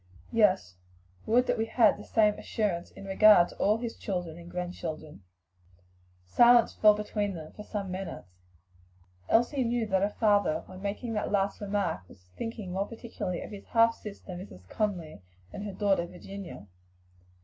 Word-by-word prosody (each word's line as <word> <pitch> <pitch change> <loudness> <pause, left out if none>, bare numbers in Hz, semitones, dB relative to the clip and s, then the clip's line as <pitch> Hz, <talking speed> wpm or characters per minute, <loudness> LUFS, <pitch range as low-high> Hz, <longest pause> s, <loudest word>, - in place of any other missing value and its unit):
"Yes; 190 - +2 0.5
would 245 +3 +4
that - - 0
we 225 - 0
had 230 -1 +4
the 205 - -10
same 210 -2 +2
assurance 190 -6 -2
in 195 - -12
regard 195 -2 +6
to - - -13
all 210 +2 +3
his 235 0 -5
children 175 -5 -4
and 170 0 -11
grandchildren." 170 - -6 1.0
Silence 240 - +5
fell 210 -1 +6
between 210 -1 -2
them 155 -2 -8
for - - -11
some 205 -3 -5
minutes. 185 - -6 1.0
Elsie 250 +4 +3
knew 235 -1 0
that 190 -3 +1
her 200 - +2
father, 205 -7 +2
when 185 0 -11
making 210 +4 -3
that 210 - -2
last 200 0 0
remark, 200 -5 -1
was 90 -1 -19
thinking 225 -5 -5
more 195 +2 -1
particularly 225 -6 -5
of - - -9
his 200 -1 -9
half 230 0 +4
sister, 205 -3 -10
Mrs. 175 - -10
Conly, 175 - -3 0.3
and 205 - -6
her 205 - -5
daughter 195 -4 +1
Virginia. 185 - -9
200 Hz, 160 wpm, -29 LUFS, 180-215 Hz, 1.0 s, regard